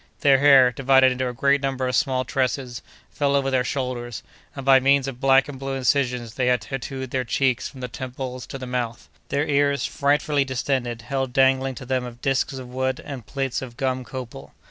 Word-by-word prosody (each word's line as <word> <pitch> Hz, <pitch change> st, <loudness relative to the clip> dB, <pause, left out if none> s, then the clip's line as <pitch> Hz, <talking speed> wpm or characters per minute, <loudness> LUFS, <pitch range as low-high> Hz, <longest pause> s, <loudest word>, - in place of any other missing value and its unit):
Their 135 Hz, -2 st, +5 dB
hair, 135 Hz, -3 st, +7 dB
divided 130 Hz, +1 st, +4 dB
into 125 Hz, 0 st, -2 dB
a -, -, -6 dB
great 140 Hz, +3 st, +2 dB
number 135 Hz, -2 st, -1 dB
of 125 Hz, -, -1 dB
small 130 Hz, -3 st, +1 dB
tresses, 130 Hz, -2 st, -2 dB, 0.3 s
fell 140 Hz, -1 st, 0 dB
over 135 Hz, -1 st, +1 dB
their 130 Hz, -1 st, +2 dB
shoulders, 125 Hz, -3 st, -4 dB, 0.3 s
and 135 Hz, -2 st, -7 dB
by 135 Hz, -1 st, +7 dB
means 135 Hz, +1 st, +3 dB
of 130 Hz, -2 st, -6 dB
black 135 Hz, 0 st, +4 dB
and 140 Hz, -3 st, -8 dB
blue 135 Hz, 0 st, -3 dB
incisions 125 Hz, -3 st, 0 dB
they 125 Hz, -1 st, 0 dB
had 125 Hz, -2 st, +2 dB
tattooed 130 Hz, -1 st, -6 dB
their 130 Hz, -1 st, 0 dB
cheeks 125 Hz, +1 st, 0 dB
from 130 Hz, -, -12 dB
the 125 Hz, -, -3 dB
temples 125 Hz, +1 st, -6 dB
to 135 Hz, -, -6 dB
the 130 Hz, -, -7 dB
mouth. 125 Hz, -2 st, -4 dB, 0.2 s
Their 140 Hz, +1 st, 0 dB
ears, 140 Hz, -1 st, +2 dB
frightfully 145 Hz, 0 st, +1 dB
distended, 130 Hz, -3 st, -2 dB
held 135 Hz, +1 st, -3 dB
dangling 135 Hz, -1 st, +3 dB
to 130 Hz, -, -9 dB
them 125 Hz, -2 st, -3 dB
disks 135 Hz, +1 st, 0 dB
of 130 Hz, -2 st, -7 dB
wood 130 Hz, +1 st, -2 dB
and 130 Hz, -6 st, -8 dB
plates 135 Hz, -3 st, -2 dB
of 120 Hz, -3 st, -9 dB
gum 130 Hz, -1 st, -1 dB
copal. 125 Hz, -1 st, -9 dB
130 Hz, 200 wpm, -23 LUFS, 125-135 Hz, 0.3 s, hair